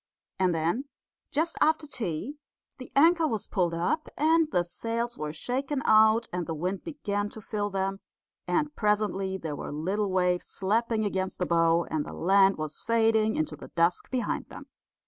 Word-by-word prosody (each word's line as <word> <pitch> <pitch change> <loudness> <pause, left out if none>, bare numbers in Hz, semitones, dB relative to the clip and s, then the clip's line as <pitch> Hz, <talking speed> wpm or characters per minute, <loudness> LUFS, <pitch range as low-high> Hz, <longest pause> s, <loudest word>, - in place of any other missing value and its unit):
And 185 -2 +2
then, 170 - 0 0.5
just 330 +3 0
after 315 0 +3
tea, 245 - -4 0.4
the 255 - -10
anchor 330 +3 +5
was 220 -7 -2
pulled 175 -4 0
up, 310 - -1
and 320 +1 +3
the 175 - +2
sails 230 +6 -3
were 150 0 -4
shaken 265 - -2
out, 220 +1 +5
and 180 -2 -2
the 165 - -3
wind 180 +5 -3
began 205 -10 -3
to 220 - -10
fill 205 -1 -3
them; 195 0 -2 0.5
and 300 -1 0
presently 210 -3 0
there 160 -5 -5
were - - -6
little 190 +8 -1
waves 180 -1 +1
slapping 220 +2 0
against 190 -2 -2
the 180 - 0
bow, 165 0 +3
and 155 -2 0
the - - -8
land 195 +2 +4
was 155 -1 -5
fading 225 -1 +2
into 155 0 -1
the 150 - -11
dusk 170 +1 +1
behind 255 -2 -2
them. - - -10
205 Hz, 170 wpm, -28 LUFS, 175-240 Hz, 0.5 s, anchor